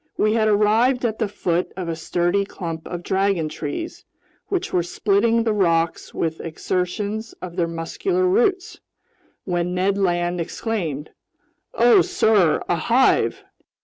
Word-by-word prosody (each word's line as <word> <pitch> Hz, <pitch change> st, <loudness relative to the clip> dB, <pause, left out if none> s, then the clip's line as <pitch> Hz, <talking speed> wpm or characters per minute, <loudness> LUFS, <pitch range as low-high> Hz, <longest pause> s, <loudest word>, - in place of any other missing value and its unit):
We 215 Hz, 0 st, +2 dB
had 220 Hz, -1 st, +2 dB
arrived 220 Hz, +5 st, +3 dB
at 220 Hz, -2 st, -2 dB
the 220 Hz, -, +1 dB
foot 180 Hz, -3 st, -1 dB
of 185 Hz, -2 st, -4 dB
a 165 Hz, -, -2 dB
sturdy 175 Hz, +4 st, 0 dB
clump 165 Hz, -5 st, -6 dB
of 175 Hz, -1 st, -6 dB
dragon 190 Hz, -5 st, 0 dB
trees, 155 Hz, -, -5 dB, 0.4 s
which 380 Hz, -3 st, -2 dB
were 180 Hz, -, +3 dB
splitting 215 Hz, +6 st, +1 dB
the 225 Hz, -2 st, +1 dB
rocks 170 Hz, -4 st, +1 dB
with 160 Hz, -1 st, -3 dB
exertions 200 Hz, +6 st, -3 dB
of 175 Hz, -2 st, -9 dB
their 175 Hz, -2 st, +1 dB
muscular 355 Hz, -, -1 dB
roots, 395 Hz, +1 st, +1 dB, 0.7 s
when 180 Hz, -1 st, -1 dB
Ned 195 Hz, +2 st, +1 dB
Land 175 Hz, -2 st, 0 dB
exclaimed: 165 Hz, -, -4 dB, 0.6 s
"Oh, 240 Hz, +1 st, +6 dB
sir, 200 Hz, -8 st, +2 dB
a 175 Hz, -, +1 dB
hive!" 240 Hz, +10 st, +2 dB
195 Hz, 140 wpm, -22 LUFS, 170-225 Hz, 0.7 s, Oh